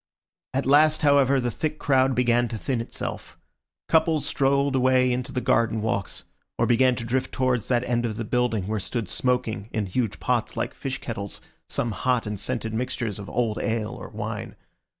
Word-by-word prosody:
At 135 Hz, -, 0 dB
last, 155 Hz, +3 st, +5 dB
however, 140 Hz, -2 st, +5 dB
the 120 Hz, -1 st, -1 dB
thick 155 Hz, +6 st, -3 dB
crowd 135 Hz, -2 st, +2 dB
began 120 Hz, -1 st, +3 dB
to 115 Hz, -, -5 dB
thin 125 Hz, +1 st, -1 dB
itself. 115 Hz, -, -6 dB, 0.5 s
Couples 160 Hz, -1 st, +3 dB
strolled 140 Hz, 0 st, +2 dB
away 130 Hz, 0 st, +4 dB
into 125 Hz, +1 st, -2 dB
the 125 Hz, -, -2 dB
garden 115 Hz, -1 st, +2 dB
walks, 100 Hz, -3 st, -2 dB, 0.3 s
or -, -, +2 dB
began 125 Hz, +1 st, +4 dB
to 115 Hz, -, -5 dB
drift 125 Hz, +3 st, -1 dB
towards 125 Hz, -3 st, 0 dB
that 120 Hz, -1 st, +2 dB
end 120 Hz, -1 st, 0 dB
of 110 Hz, -2 st, -5 dB
the 115 Hz, -, -3 dB
building 115 Hz, -4 st, 0 dB
where 110 Hz, +2 st, -1 dB
stood 115 Hz, +2 st, -3 dB
smoking, 115 Hz, -2 st, -1 dB
in 110 Hz, -3 st, -1 dB
huge 110 Hz, +3 st, -2 dB
pots -, -, -1 dB
like -, -, -2 dB
fish 135 Hz, 0 st, -4 dB
kettles, 100 Hz, -4 st, -5 dB, 0.3 s
some 120 Hz, -, -1 dB
hot 125 Hz, +3 st, 0 dB
and 105 Hz, -1 st, -4 dB
scented 115 Hz, 0 st, -2 dB
mixtures 115 Hz, -3 st, -2 dB
of 100 Hz, -, -8 dB
old 115 Hz, -2 st, 0 dB
ale 110 Hz, -2 st, -1 dB
or -, -, -8 dB
wine. -, -, -5 dB
125 Hz, 185 wpm, -25 LUFS, 110-130 Hz, 0.5 s, last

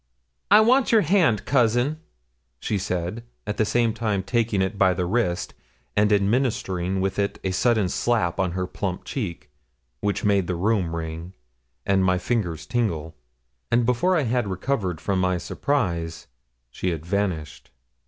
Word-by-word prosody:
'I 210 Hz, +2 st, +8 dB
want 250 Hz, +4 st, +4 dB
your 225 Hz, -2 st, +6 dB
hand, 165 Hz, -, +2 dB
cousin,' 125 Hz, +3 st, +2 dB, 0.6 s
she 105 Hz, -, -1 dB
said, 90 Hz, +4 st, -3 dB, 0.2 s
at 105 Hz, 0 st, -3 dB
the 110 Hz, -, +2 dB
same 115 Hz, 0 st, +1 dB
time 105 Hz, -4 st, -1 dB
taking 115 Hz, -2 st, 0 dB
it 95 Hz, +2 st, 0 dB
by 95 Hz, -2 st, +3 dB
the 90 Hz, -, -1 dB
wrist, 90 Hz, -3 st, -1 dB, 0.4 s
and 105 Hz, +1 st, +3 dB
administering 100 Hz, -4 st, +1 dB
with 95 Hz, +1 st, -1 dB
it 100 Hz, 0 st, 0 dB
a 95 Hz, -, 0 dB
sudden 110 Hz, 0 st, +2 dB
slap 105 Hz, -2 st, 0 dB
on 90 Hz, -2 st, 0 dB
her 90 Hz, 0 st, -1 dB
plump 90 Hz, 0 st, -4 dB
cheek, 90 Hz, -, -5 dB, 0.5 s
which 105 Hz, 0 st, -1 dB
made 100 Hz, -3 st, +2 dB
the 90 Hz, -, -1 dB
room 90 Hz, -2 st, 0 dB
ring, 80 Hz, +2 st, -6 dB, 0.5 s
and 95 Hz, -1 st, +3 dB
my 90 Hz, 0 st, +3 dB
fingers 90 Hz, -6 st, -2 dB
tingle; 80 Hz, -7 st, -2 dB, 0.5 s
and 120 Hz, 0 st, +3 dB
before 125 Hz, +10 st, +2 dB
I 155 Hz, -, +1 dB
had 120 Hz, -2 st, 0 dB
recovered 95 Hz, -, -2 dB
from 95 Hz, -2 st, -1 dB
my 90 Hz, -1 st, +1 dB
surprise, 85 Hz, -, -2 dB, 0.5 s
she 90 Hz, -, -2 dB
had 80 Hz, -2 st, -4 dB
vanished. 85 Hz, -5 st, -2 dB
100 Hz, 155 wpm, -24 LUFS, 90-120 Hz, 0.6 s, I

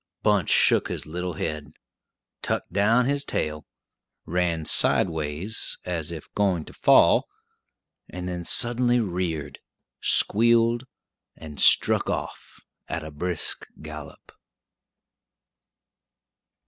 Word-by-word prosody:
Bunch 105 Hz, -5 st, +2 dB
shook -, -, +3 dB
his -, -, -5 dB
little 90 Hz, +3 st, -5 dB
head, 75 Hz, -2 st, -5 dB, 0.7 s
tucked -, -, -3 dB
down 110 Hz, +5 st, +3 dB
his 140 Hz, +1 st, -1 dB
tail, 75 Hz, -, -3 dB, 0.6 s
ran 85 Hz, -2 st, -1 dB
sideways, 80 Hz, +7 st, +1 dB
as 85 Hz, -3 st, -2 dB
if 80 Hz, -3 st, -8 dB
going 95 Hz, -6 st, 0 dB
to -, -, -12 dB
fall, -, -, +4 dB, 0.8 s
and 90 Hz, 0 st, -7 dB
then 90 Hz, -1 st, -4 dB
suddenly 120 Hz, +4 st, +3 dB
reared, 85 Hz, -8 st, -3 dB, 0.4 s
squealed, 115 Hz, +2 st, +2 dB, 0.5 s
and 75 Hz, -3 st, -10 dB
struck -, -, +4 dB
off -, -, -6 dB, 0.3 s
at 80 Hz, -, -4 dB
a 80 Hz, -, -8 dB
brisk 85 Hz, +2 st, -3 dB
gallop. 75 Hz, -1 st, -11 dB
90 Hz, 100 wpm, -24 LUFS, 80-105 Hz, 0.8 s, fall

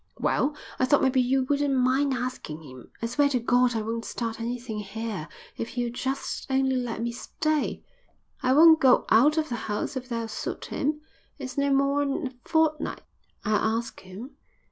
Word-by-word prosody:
"Well, 295 Hz, +2 st, +1 dB, 0.2 s
I 255 Hz, -, +4 dB
thought 285 Hz, +2 st, +3 dB
maybe 265 Hz, -1 st, +3 dB
you 260 Hz, +2 st, +2 dB
wouldn't 285 Hz, +1 st, +1 dB
mind 260 Hz, +2 st, +2 dB
asking 240 Hz, -11 st, -5 dB
him. 130 Hz, -4 st, -12 dB
I -, -, +2 dB
swear 280 Hz, +5 st, +2 dB
to 255 Hz, -3 st, +1 dB
God 245 Hz, +1 st, +3 dB
I 220 Hz, -, -1 dB
won't 230 Hz, +1 st, -3 dB
start 230 Hz, -1 st, -4 dB
anything 235 Hz, -2 st, -4 dB
here 210 Hz, -4 st, -5 dB, 0.3 s
if 230 Hz, -, -3 dB
he'll 240 Hz, -1 st, -2 dB
just 265 Hz, +3 st, -3 dB
only 265 Hz, 0 st, +2 dB
let 240 Hz, -3 st, -2 dB
me 235 Hz, -, -1 dB
stay. 310 Hz, +5 st, -2 dB, 0.6 s
I 255 Hz, -1 st, +3 dB
won't 320 Hz, +2 st, +8 dB
go 260 Hz, -2 st, +5 dB
out 295 Hz, +8 st, +5 dB
of 310 Hz, -1 st, 0 dB
the 240 Hz, -, -2 dB
house 210 Hz, +6 st, -2 dB
if 255 Hz, -1 st, -5 dB
that'll 230 Hz, -1 st, -2 dB
suit -, -, -5 dB
him. 300 Hz, +2 st, -2 dB, 0.4 s
It's 260 Hz, -, -6 dB
no 280 Hz, -1 st, +1 dB
more'n 275 Hz, +2 st, +1 dB
a 250 Hz, -1 st, -9 dB
fortnight." 320 Hz, -2 st, +1 dB, 0.4 s
"I'll 215 Hz, +1 st, +2 dB
ask 230 Hz, 0 st, -6 dB
him." 195 Hz, +9 st, -10 dB
255 Hz, 180 wpm, -26 LUFS, 230-280 Hz, 0.6 s, won't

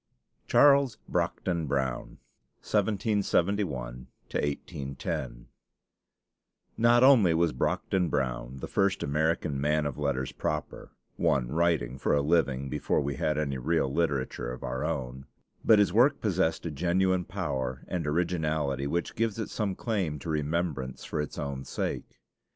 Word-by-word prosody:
CHARLES 140 Hz, -4 st, +5 dB
BROCKDEN 85 Hz, -4 st, -1 dB
BROWN 65 Hz, -2 st, -2 dB, 0.5 s
(1771 100 Hz, -, 0 dB, 0.3 s
1810) 70 Hz, -4 st, -3 dB, 1.3 s
Not 120 Hz, +2 st, +5 dB
only 115 Hz, -11 st, +6 dB
was 85 Hz, -2 st, +2 dB
Brockden 90 Hz, +7 st, 0 dB
Brown 65 Hz, -2 st, -2 dB
the -, -, -6 dB
first 100 Hz, -1 st, +1 dB
American 75 Hz, -1 st, 0 dB
man 75 Hz, +1 st, +1 dB
of 70 Hz, -1 st, -4 dB
letters 70 Hz, -3 st, -1 dB
proper, 75 Hz, 0 st, -4 dB, 0.3 s
one 60 Hz, -3 st, +1 dB
writing 75 Hz, -5 st, 0 dB
for 70 Hz, -, +2 dB
a 70 Hz, -, +2 dB
living 70 Hz, -4 st, +1 dB
before -, -, 0 dB
we 70 Hz, -2 st, -2 dB
had 75 Hz, -1 st, 0 dB
any 70 Hz, -3 st, -1 dB
real 70 Hz, -1 st, 0 dB
literature 70 Hz, -7 st, -1 dB
of 65 Hz, -, -8 dB
our 65 Hz, +2 st, -3 dB
own, 65 Hz, -4 st, -4 dB, 0.4 s
but 110 Hz, -, +6 dB
his 100 Hz, -4 st, +3 dB
work 130 Hz, +6 st, +4 dB
possessed 95 Hz, -6 st, 0 dB
a 85 Hz, -, -2 dB
genuine 90 Hz, +4 st, +1 dB
power 70 Hz, -9 st, -3 dB
and 85 Hz, -4 st, -3 dB
originality 75 Hz, -4 st, 0 dB
which 85 Hz, +4 st, -2 dB
gives 115 Hz, -2 st, -1 dB
it 110 Hz, -, -4 dB
some 100 Hz, -4 st, -1 dB
claim 95 Hz, -11 st, -1 dB
to 75 Hz, -, -7 dB
remembrance 75 Hz, -3 st, -2 dB
for -, -, -2 dB
its 75 Hz, -, -6 dB
own 70 Hz, -2 st, -4 dB
sake. -, -, -4 dB
75 Hz, 135 wpm, -28 LUFS, 70-95 Hz, 1.3 s, only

